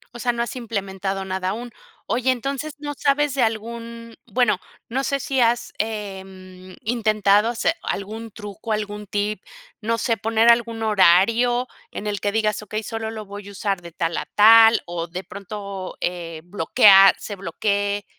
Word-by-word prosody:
O -, -, -7 dB
sea, 245 Hz, 0 st, +1 dB
no 235 Hz, 0 st, -1 dB
has 240 Hz, -, -6 dB
implementado 195 Hz, -4 st, -4 dB
nada 185 Hz, 0 st, -2 dB
aún. 235 Hz, +4 st, -5 dB, 0.3 s
Oye, 245 Hz, +4 st, 0 dB
entonces, 275 Hz, +4 st, -3 dB
¿no 290 Hz, 0 st, -5 dB
sabes 290 Hz, 0 st, +1 dB
de 270 Hz, -, 0 dB
algún? 230 Hz, +1 st, -3 dB
Bueno, 240 Hz, -4 st, +2 dB, 0.3 s
no 265 Hz, +4 st, -2 dB
sé 275 Hz, 0 st, 0 dB
si 270 Hz, 0 st, -1 dB
has, 235 Hz, +1 st, +1 dB
em, 190 Hz, -3 st, -6 dB
intentado 215 Hz, -2 st, +2 dB
hacer 245 Hz, +7 st, 0 dB
algún 220 Hz, +3 st, -5 dB
truco, 210 Hz, +1 st, -6 dB
algún 210 Hz, -1 st, -4 dB
tip, 205 Hz, +1 st, -2 dB, 0.4 s
no 230 Hz, +2 st, 0 dB
sé, 230 Hz, 0 st, 0 dB
poner 225 Hz, +2 st, +3 dB
algún 230 Hz, -1 st, 0 dB
horario 225 Hz, +5 st, +4 dB, 0.2 s
en 210 Hz, -, -7 dB
el 205 Hz, -1 st, -2 dB
que 205 Hz, -, 0 dB
digas, 215 Hz, -1 st, 0 dB
okey, 215 Hz, +1 st, -5 dB
solo 225 Hz, +1 st, -4 dB
lo 220 Hz, -1 st, -7 dB
voy 200 Hz, 0 st, -9 dB
a -, -, -9 dB
usar 195 Hz, -2 st, -2 dB
de 170 Hz, -1 st, -10 dB
tal 165 Hz, 0 st, -2 dB
a -, -, -4 dB
tal 225 Hz, +2 st, +7 dB
o 170 Hz, -1 st, -4 dB
de 180 Hz, +3 st, -6 dB
pronto, 200 Hz, 0 st, -7 dB
eh, 170 Hz, -2 st, -4 dB
bloquear, 195 Hz, +2 st, +6 dB
se 205 Hz, -, -7 dB
bloquee, 200 Hz, +3 st, -1 dB
215 Hz, 170 wpm, -22 LUFS, 195-230 Hz, 0.4 s, tal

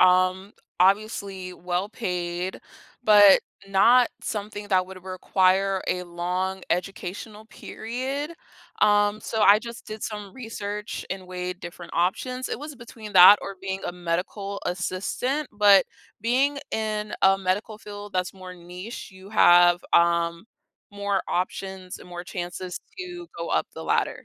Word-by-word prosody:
um, 185 Hz, +2 st, +3 dB, 0.3 s
obviously 195 Hz, -1 st, +1 dB
well-paid, 180 Hz, -1 st, -3 dB, 0.4 s
but 205 Hz, -3 st, +8 dB, 0.3 s
not 235 Hz, +6 st, +5 dB
something 205 Hz, -1 st, -5 dB
that 185 Hz, -2 st, +3 dB
would 185 Hz, -1 st, -11 dB
require 190 Hz, +1 st, +1 dB
a 180 Hz, -, -1 dB
long 180 Hz, +2 st, -3 dB
educational 195 Hz, +4 st, -4 dB
period, 260 Hz, +8 st, -5 dB, 0.5 s
um, 205 Hz, 0 st, +4 dB
so 220 Hz, 0 st, -3 dB
I 205 Hz, 0 st, +7 dB
just 235 Hz, 0 st, -9 dB
did 215 Hz, 0 st, -7 dB
some 210 Hz, -3 st, -6 dB
research 210 Hz, -3 st, -5 dB
and 190 Hz, -1 st, -5 dB
weighed 180 Hz, 0 st, -5 dB
different 175 Hz, 0 st, -9 dB
options. 250 Hz, +9 st, -1 dB
It -, -, -3 dB
was 295 Hz, +1 st, -8 dB
between 225 Hz, -3 st, -11 dB
that, 185 Hz, +3 st, +10 dB
or 195 Hz, -1 st, -7 dB
being 190 Hz, 0 st, -4 dB
a -, -, -3 dB
medical 180 Hz, +3 st, -3 dB
assistant, 195 Hz, +11 st, -2 dB
but 205 Hz, -2 st, +6 dB, 0.3 s
being 265 Hz, +5 st, +2 dB
in 215 Hz, -1 st, -2 dB
a 195 Hz, 0 st, +5 dB
medical 200 Hz, +3 st, -2 dB
field 205 Hz, -1 st, -9 dB
that's 185 Hz, +1 st, -1 dB
more 185 Hz, -1 st, -9 dB
niche, 180 Hz, +6 st, -9 dB
you 190 Hz, +1 st, -14 dB
have, 175 Hz, -4 st, +6 dB
um, 170 Hz, +1 st, +3 dB, 0.5 s
more 200 Hz, -1 st, -1 dB
options, 185 Hz, 0 st, -3 dB
and -, -, -14 dB
more 175 Hz, 0 st, -7 dB
chances 180 Hz, 0 st, -5 dB, 0.2 s
to 355 Hz, -1 st, -7 dB
go -, -, -4 dB
up -, -, +1 dB
the -, -, -8 dB
ladder. -, -, 0 dB
195 Hz, 135 wpm, -25 LUFS, 180-215 Hz, 0.5 s, that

